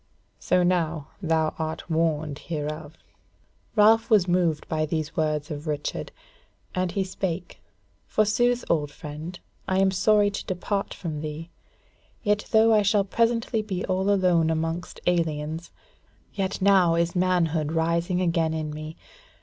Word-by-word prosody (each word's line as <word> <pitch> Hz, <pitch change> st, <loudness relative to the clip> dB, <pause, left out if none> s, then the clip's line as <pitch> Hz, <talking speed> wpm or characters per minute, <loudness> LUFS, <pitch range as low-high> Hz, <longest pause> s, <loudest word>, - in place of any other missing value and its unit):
So 180 Hz, -, +2 dB
now 165 Hz, -4 st, 0 dB
thou 160 Hz, -3 st, +1 dB
art 160 Hz, 0 st, -4 dB
warned 155 Hz, -3 st, 0 dB
hereof." 155 Hz, -1 st, -5 dB, 0.8 s
Ralph 220 Hz, +1 st, +5 dB
was 205 Hz, -5 st, +5 dB
moved 175 Hz, -3 st, +1 dB
by 155 Hz, -1 st, 0 dB
these 155 Hz, 0 st, -3 dB
words 155 Hz, -1 st, -1 dB
of 150 Hz, +1 st, -6 dB
Richard, 150 Hz, -1 st, -3 dB, 0.6 s
and 185 Hz, -1 st, -1 dB
he 195 Hz, -, 0 dB
spake: 185 Hz, -2 st, -4 dB, 0.5 s
"Forsooth, 240 Hz, +3 st, +2 dB
old 150 Hz, -3 st, +1 dB
friend, 150 Hz, +4 st, -8 dB, 0.3 s
I 190 Hz, -1 st, +1 dB
am 190 Hz, 0 st, +4 dB
sorry 205 Hz, +2 st, +3 dB
to 200 Hz, -, -5 dB
depart 195 Hz, +2 st, -2 dB
from 155 Hz, -4 st, -5 dB
thee; 155 Hz, +2 st, -6 dB, 0.7 s
yet 210 Hz, -1 st, +1 dB
though 220 Hz, +1 st, +5 dB
I 215 Hz, -, +5 dB
shall 205 Hz, 0 st, +3 dB
presently 230 Hz, +2 st, +1 dB
be 195 Hz, -3 st, -3 dB
all 190 Hz, +1 st, 0 dB
alone 180 Hz, -5 st, +3 dB
amongst 165 Hz, +2 st, -2 dB
aliens, 160 Hz, -2 st, -1 dB, 0.6 s
yet 190 Hz, -1 st, -2 dB
now 190 Hz, -4 st, +5 dB
is 170 Hz, +1 st, 0 dB
manhood 170 Hz, -4 st, +1 dB
rising 170 Hz, +2 st, +1 dB
again 165 Hz, -2 st, +1 dB
in 155 Hz, -1 st, -3 dB
me. 155 Hz, +1 st, -7 dB
170 Hz, 140 wpm, -25 LUFS, 155-195 Hz, 0.8 s, Ralph